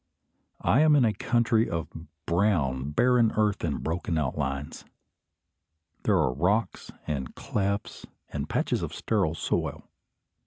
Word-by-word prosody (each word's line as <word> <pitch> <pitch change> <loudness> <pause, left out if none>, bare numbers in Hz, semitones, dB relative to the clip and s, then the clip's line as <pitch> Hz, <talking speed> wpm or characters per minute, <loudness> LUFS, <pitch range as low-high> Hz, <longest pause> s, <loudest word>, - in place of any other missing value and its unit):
I 120 - +4
am 155 -1 +6
in 135 -4 +5
a 110 - +2
country 115 -1 +1
of 85 -1 -2 0.4
brown 80 -8 +1
barren 120 +7 +3
earth 105 -2 +1
and 80 -4 -2
broken 85 0 -2
outlines. 70 -1 -3 1.2
There - - +4
are 65 - +2
rocks 95 - 0
and 70 -5 -4
clefts 100 0 -3 0.2
and 75 0 -4
patches - - 0
of - - -4
sterile 95 -8 0
soil. - - -2
90 Hz, 125 wpm, -27 LUFS, 75-110 Hz, 1.2 s, am